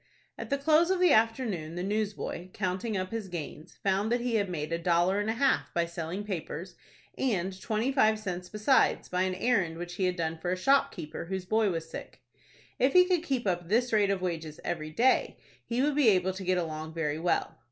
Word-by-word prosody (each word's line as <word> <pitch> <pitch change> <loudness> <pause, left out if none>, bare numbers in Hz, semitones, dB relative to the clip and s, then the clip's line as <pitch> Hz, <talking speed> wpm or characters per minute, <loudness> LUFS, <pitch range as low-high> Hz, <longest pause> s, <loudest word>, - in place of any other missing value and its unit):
At - - -7
the 280 - +1
close 315 +4 +4
of 380 -1 +1
the 360 -4 +5
afternoon 220 -8 +1
the 175 - -3
newsboy, 205 -3 -3
counting 190 +3 -2
up 185 0 -3
his 225 -3 -4
gains, 160 -3 -7
found 200 +3 +1
that 240 - +2
he 240 0 -2
had 205 -3 +1
made 160 -2 -3
a 165 - -1
dollar 175 +3 +2
and 205 +1 -1
a - - +1
half 270 +3 +1
by 170 0 +2
selling 170 +3 -5
papers, 185 -2 -5 0.5
and 190 -6 -1
twenty 225 +5 0
five 220 -5 +3
cents 180 -4 -5
besides, 215 +7 +2
by 180 0 0
an 185 0 0
errand 190 -6 +1
which 175 +1 -6
he 190 - +1
had 180 0 0
done 165 -2 -2
for 175 +2 -2
a 185 - 0
shopkeeper 185 - +1
whose 190 +1 -4
boy 220 +2 +2
was 165 -2 -3
sick. - - -9 0.6
If 260 +2 +3
he 360 0 +7
could 360 -3 +1
keep 270 -8 -2
up 175 -3 -1
this 240 +3 +2
rate 205 -2 +4
of 195 -2 -1
wages 165 -3 -4
every 155 -3 -3
day, 240 +12 +2 0.3
he 240 +2 0
would 295 +1 +2
be 280 -5 +5
able 190 -2 +2
to 190 +1 -7
get 185 0 +1
along 160 -2 -4
very 155 -2 -1
well. 175 +1 -1
190 Hz, 215 wpm, -29 LUFS, 175-225 Hz, 0.6 s, he